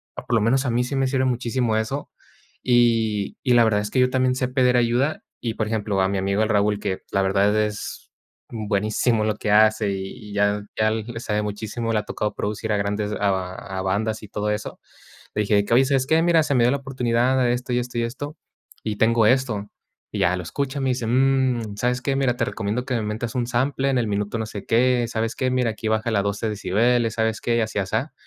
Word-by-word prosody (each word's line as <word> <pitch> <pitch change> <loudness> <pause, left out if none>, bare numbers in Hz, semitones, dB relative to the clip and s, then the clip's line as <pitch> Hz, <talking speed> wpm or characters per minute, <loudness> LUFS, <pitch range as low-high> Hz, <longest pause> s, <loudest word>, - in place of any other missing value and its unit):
por 120 - -5
lo 115 - +4
menos 130 +6 +2
a 125 - 0
mí 120 +1 +1
sí 135 +3 -4
me 135 0 +2
sirve 130 0 +1
muchísimo 120 -2 0
eso, 135 +6 -3 0.5
y 115 -4 +2
y 125 - +3
la 120 -1 +6
verdad 105 -2 +2
es 105 - -5
que 130 - +1
yo 125 0 +4
también 130 0 +2
sé 125 -1 0
pedir 125 -1 +2
ayuda. 120 +5 +1 0.2
Y 115 -2 -2
por 110 - -1
ejemplo, 105 -3 -1
a 95 - +2
mi 100 - -1
amigo 100 +2 0
el 110 - +1
Raúl, 105 0 +2
que 95 -2 -3
la 95 - +2
verdad 100 +2 +2
es 105 -1 -5 0.4
buenísimo 110 +1 0
en - - 0
lo 105 - 0
que 105 - -2
hace, 110 0 +4
y 100 +2 -6
ya 105 0 +1
ya 110 0 +3
le 115 +1 -4
sabe 105 -2 -1
muchísimo, 110 +2 -3
le 105 - +2
ha - - -4
tocado 105 0 -3
producir 105 +1 -3
a - - +1
grandes 105 +1 -1
a 95 -3 -1 0.3
a - - -1
bandas 110 +3 -1
y - - -8
todo 105 +1 -2
eso. 105 0 -4 0.6
Le - - -1
dije: 100 0 +2
"Oye, 130 +3 +6
¿sabes 135 -1 +1
qué? 160 +1 +3
Mira, 165 -2 +4
se 145 - -1
me 120 - +4
dio 120 - +4
la 140 - +1
oportunidad 130 -1 0
de 120 - +2
esto 125 0 -3
y 125 - +2
esto 125 -1 -5
y 115 - +1
esto 145 +6 -5 0.5
y 105 -1 -3
tengo 115 0 +3
esto". 115 -5 +1 0.4
Y - - -3
ya, 90 +2 +3
lo 90 - -5
escucha, 140 - -3
me 135 - 0
dice: 125 -3 -2
"Mm, 130 -4 +1
¿sabes 125 +2 0
qué? 135 0 0
Mira, 130 -3 +1
te 115 - +1
recomiendo 115 +1 -3
que 130 - -3
me 115 - 0
metas 110 +3 -3
un 120 -1 0
sample 135 +3 0
en 130 - +1
el 115 -3 0
minuto 105 +2 -2
no 110 - -2
sé 105 -2 -7
qué. 120 +1 +3
¿Sabes 115 -1 -2
qué? 130 -1 0
Mira, 125 -3 +1
aquí 110 +1 -6
bájale 110 -1 +1
12 100 +2 -2
decibeles, 115 +3 +1
¿sabes 110 -1 0
qué?". 120 - 0
Y - - +2
así 110 -1 -2
asá. 110 +9 -2
115 Hz, 235 wpm, -23 LUFS, 105-125 Hz, 0.6 s, la